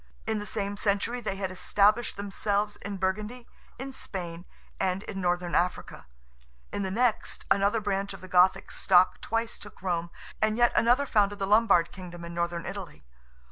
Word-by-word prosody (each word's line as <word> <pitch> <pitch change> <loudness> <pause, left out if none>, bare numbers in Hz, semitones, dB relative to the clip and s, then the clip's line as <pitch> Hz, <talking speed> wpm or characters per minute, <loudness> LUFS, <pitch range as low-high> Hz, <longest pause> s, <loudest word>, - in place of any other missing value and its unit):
In 220 -1 -1
the 205 - -6
same 200 0 -3
century 210 +5 0
they 195 - -3
had 190 -1 -3
established 205 +5 +2
themselves 205 +1 -1
in 200 0 -6
Burgundy, 210 +6 -2 0.3
in 270 +1 -6
Spain, 175 -6 -6 0.3
and 190 +1 0
in 195 -3 -5
Northern 175 -1 0
Africa; 180 - -1 0.7
in - - -2
the 190 - -1
next, 230 +3 0
another 200 +3 +3
branch 200 -1 -1
of 195 - -9
the 185 - -9
Gothic 180 +1 +4
stock 185 -1 +4
twice 230 +1 -2
took 205 - -12
Rome; 170 -2 -1 0.3
and 215 0 +2
yet 240 0 +5
another 245 +5 +4
founded 205 -5 +2
the 195 - -1
Lombard 200 -4 +4
Kingdom 175 -2 -9
in 170 - -7
Northern 170 0 -2
Italy. 190 - -7
200 Hz, 170 wpm, -28 LUFS, 180-215 Hz, 0.7 s, yet